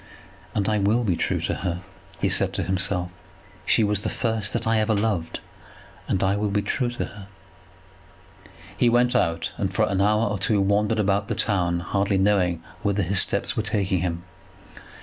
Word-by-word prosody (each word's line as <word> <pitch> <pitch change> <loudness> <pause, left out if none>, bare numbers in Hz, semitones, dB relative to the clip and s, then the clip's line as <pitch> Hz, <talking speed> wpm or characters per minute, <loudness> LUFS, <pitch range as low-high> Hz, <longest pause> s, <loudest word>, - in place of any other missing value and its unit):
"And 100 - 0
I 105 -1 +1
will 105 +5 +2
be 95 -6 +1
true - - -1
to - - -1
her," 90 -1 -3 0.4
he - - +1
said - - +1
to 100 - -2
himself. 90 0 0 0.6
"She 115 - +4
was 105 -1 +1
the - - -2
first 110 -3 -1
that - - -2
I 110 0 +2
ever 110 0 +1
loved, 100 -6 -1 0.7
and 95 - 0
I 95 +1 +2
will 105 0 0
be 100 0 0
true 120 +5 0
to 120 - -3
her." 100 -1 -11 1.5
He 120 +4 +3
went 120 +1 +3
out, 85 -1 0
and - - -1
for - - +2
an 95 -1 0
hour 105 +2 +3
or 105 -1 -2
two 100 +2 +2
wandered 105 +3 +2
about 100 -1 +1
the - - -2
town, 90 -4 0
hardly 100 +2 0
knowing 95 -4 +2 0.2
whither 100 -1 0
his 90 +2 +2
steps - - 0
were - - +1
taking 100 -4 0
him. 85 -1 -3
100 Hz, 190 wpm, -24 LUFS, 95-105 Hz, 1.5 s, She